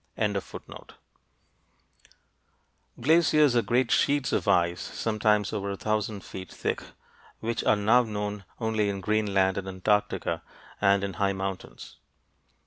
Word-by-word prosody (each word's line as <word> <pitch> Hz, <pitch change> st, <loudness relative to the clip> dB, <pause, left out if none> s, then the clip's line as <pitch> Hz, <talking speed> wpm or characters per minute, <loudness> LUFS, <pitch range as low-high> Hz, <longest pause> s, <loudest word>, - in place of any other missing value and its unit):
Glaciers 155 Hz, -1 st, +4 dB
are 120 Hz, -, +5 dB
great 120 Hz, +1 st, +1 dB
sheets 140 Hz, -4 st, +2 dB
of -, -, 0 dB
ice, 85 Hz, 0 st, +2 dB
sometimes 105 Hz, -1 st, 0 dB
over 100 Hz, -2 st, -2 dB
a 100 Hz, -, -4 dB
thousand 105 Hz, -1 st, -2 dB
feet 95 Hz, -2 st, -9 dB
thick, -, -, -2 dB, 0.6 s
which 115 Hz, +1 st, -2 dB
are -, -, +5 dB
now 110 Hz, +4 st, +4 dB
known 105 Hz, -3 st, -4 dB, 0.2 s
only 110 Hz, -2 st, 0 dB
in 100 Hz, -1 st, -3 dB
Greenland 100 Hz, -2 st, +1 dB
and 95 Hz, -, -7 dB
Antarctica 100 Hz, +2 st, 0 dB, 0.4 s
and 100 Hz, -1 st, +4 dB
in 100 Hz, -1 st, -3 dB
high 100 Hz, 0 st, +2 dB
mountains. 95 Hz, -1 st, -6 dB
105 Hz, 120 wpm, -27 LUFS, 100-115 Hz, 0.6 s, are